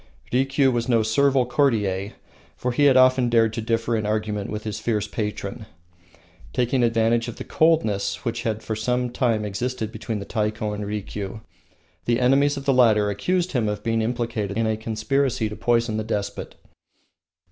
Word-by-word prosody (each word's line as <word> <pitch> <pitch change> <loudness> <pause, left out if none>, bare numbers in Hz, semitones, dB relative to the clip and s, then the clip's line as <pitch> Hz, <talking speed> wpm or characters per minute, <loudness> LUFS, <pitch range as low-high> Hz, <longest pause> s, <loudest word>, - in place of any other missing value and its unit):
Rikiu 135 +1 +3
was 120 0 -1
no 115 -2 +3
servile 130 +3 +3
courtier, 105 -7 0 0.5
and 125 0 0
had 140 0 +5
often 130 -1 +5
dared 115 -2 +3
to 115 - -3
differ 115 +1 0
in 110 -1 -1
argument 105 -1 -2
with 105 0 -5
his 110 -1 -4
fierce 110 -2 -1
patron. 105 0 -4 0.9
Taking 125 +1 +1
advantage 115 0 +2
of 120 - -6
the - - -7
coldness 145 -12 +1
which 115 0 -2
had 110 -2 -2
for 110 - -3
some 125 +2 -1
time 115 -4 0
existed 110 +2 -3
between 110 0 -4
the 100 - -6
Taiko 105 -1 -2
and 105 0 -4
Rikiu, 105 0 -5 0.6
the 120 0 +1
enemies 140 +3 +3
of 140 - -6
the 135 - +3
latter 110 -5 +4
accused 180 - -1
him 115 -5 0
of 105 0 -4
being 115 0 0
implicated 115 -3 -2
in 115 - +1
a 110 0 +1
conspiracy 115 +2 -1
to 105 - -7
poison 115 -2 +1
the 110 - -1
despot. 105 -2 -4
115 Hz, 170 wpm, -23 LUFS, 105-125 Hz, 0.9 s, had